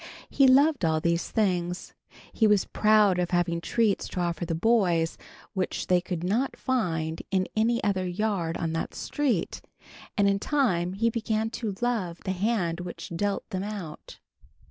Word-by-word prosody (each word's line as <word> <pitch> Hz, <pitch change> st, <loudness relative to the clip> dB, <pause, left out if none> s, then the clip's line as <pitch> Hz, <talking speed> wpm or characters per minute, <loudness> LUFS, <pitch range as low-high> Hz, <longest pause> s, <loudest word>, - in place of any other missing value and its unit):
He 275 Hz, -, +5 dB
loved 280 Hz, -, +5 dB
all 160 Hz, -1 st, +2 dB
these 170 Hz, +1 st, 0 dB
things. 180 Hz, -4 st, -1 dB, 0.4 s
He 220 Hz, -, +3 dB
was 210 Hz, -2 st, +3 dB
proud 210 Hz, -3 st, +3 dB
of 175 Hz, -1 st, 0 dB
having 175 Hz, -1 st, 0 dB
treats 220 Hz, +2 st, +1 dB
to -, -, -5 dB
offer 170 Hz, -1 st, -1 dB
the 165 Hz, -, -1 dB
boys 175 Hz, -4 st, +2 dB, 0.4 s
which 190 Hz, -3 st, -2 dB
they 180 Hz, -1 st, +3 dB
could 175 Hz, -2 st, -4 dB
not 230 Hz, +9 st, 0 dB
find 165 Hz, -11 st, -1 dB
in 190 Hz, -1 st, +1 dB
any 230 Hz, +2 st, +1 dB
other 190 Hz, -3 st, 0 dB
yard 180 Hz, -3 st, -1 dB
on 165 Hz, -1 st, -2 dB
that 165 Hz, -, -3 dB
street, 255 Hz, -, -1 dB, 0.6 s
and 200 Hz, -1 st, +4 dB
in 200 Hz, 0 st, +2 dB
time 185 Hz, -11 st, +1 dB
he 230 Hz, +4 st, +1 dB
began 225 Hz, -1 st, -1 dB
to 220 Hz, -5 st, -4 dB
love 215 Hz, -9 st, -1 dB
the 190 Hz, -, 0 dB
hand 185 Hz, -3 st, 0 dB
which 175 Hz, -1 st, -7 dB
dealt 200 Hz, +3 st, -1 dB
them 185 Hz, -, -2 dB
out. 200 Hz, -7 st, -7 dB
190 Hz, 165 wpm, -27 LUFS, 175-220 Hz, 0.6 s, He